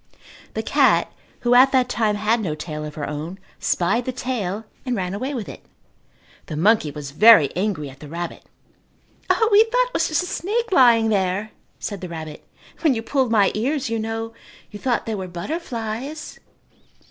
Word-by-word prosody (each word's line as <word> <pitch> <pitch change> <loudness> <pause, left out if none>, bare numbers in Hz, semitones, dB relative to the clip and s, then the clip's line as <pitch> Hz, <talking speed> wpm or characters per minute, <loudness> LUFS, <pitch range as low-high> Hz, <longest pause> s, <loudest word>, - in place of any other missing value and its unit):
The - - -2
cat, - - +3 0.3
who 240 0 +2
at 260 +2 +7
that 255 -2 +3
time 220 -4 0
had 215 +3 +1
no 165 -7 -2
tail 155 -1 -6
of 150 - -8
her 145 -2 -4
own, 155 +5 -5 0.2
spied 230 +8 +1
the 255 - -1
tail 225 -5 -3 0.2
and 250 -2 -1
ran 185 -3 -2
away 260 +8 -3
with 225 -5 -4
it. - - -10 0.8
The 155 - -5
monkey 200 -1 +3
was 145 -1 -7
very 200 -3 +6
angry 185 -6 -1
at 135 0 -12
the 150 - -10
rabbit. 170 +3 -5 0.9
"O, 445 -1 +3
we 410 +1 +8
thought - - +1
it - - -26
was - - +1
just 320 +3 0
a - - -5
snake 435 +6 -2
lying 235 -8 +5
there," 200 +1 0 0.3
said 200 -3 -5
the 180 - -6
rabbit. 160 -2 -7 0.4
"When 305 -6 +3
you 225 - -3
pulled 265 0 0
my 210 -4 +4
ears, 260 +3 -1
you 230 - 0
know, 225 +1 -4 0.4
you 205 - -8
thought 245 0 0
they 225 - -3
were 190 -3 -4
butterflies." 235 - -5
220 Hz, 185 wpm, -22 LUFS, 180-255 Hz, 0.9 s, we